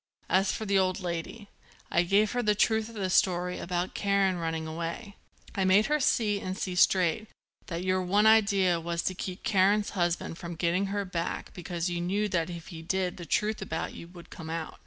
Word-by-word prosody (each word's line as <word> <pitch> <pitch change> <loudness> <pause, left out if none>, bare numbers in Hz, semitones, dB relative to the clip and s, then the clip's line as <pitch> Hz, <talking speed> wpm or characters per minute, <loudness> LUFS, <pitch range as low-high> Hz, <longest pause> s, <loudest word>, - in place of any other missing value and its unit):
As 190 +1 +3
for 220 - -4
the 200 -1 +3
old 185 0 +1
lady, 180 +4 -5 0.4
I 170 - +4
gave 200 +4 +3
her 245 - 0
the 210 -3 +2
truth 220 +1 +2
of 230 - -12
the 190 -3 -2
story 180 -1 +2
about 180 +1 -2
Karen 195 -2 +1
running 165 -1 -2
away. 170 +6 -5 0.4
I 195 - 0
made 190 +3 +5
her 300 +1 +1
see, 215 -6 +2
and 185 -1 -4
see 185 - -3
straight, 180 +2 +3 0.4
that 170 0 -4
your 185 0 +1
one 200 +4 +2
idea 200 -5 +4
was 170 0 -3
to 185 - -1
keep 185 0 -6
Karen's 205 +1 +3
husband 175 -3 -1
from 170 0 -6
getting 175 +4 0
her 200 0 -2
back 170 -2 -4
because 175 -1 -3
you 175 0 -2
knew 200 +4 0
that 170 -3 0
if 170 -2 -8
he 165 -2 -8
did 180 +2 -1
the 170 -2 -8
truth 210 +7 0
about 165 -4 -4
you 170 - -9
would 175 -1 -14
come 160 -2 -8
out. 165 -1 -5
185 Hz, 205 wpm, -28 LUFS, 170-200 Hz, 0.4 s, made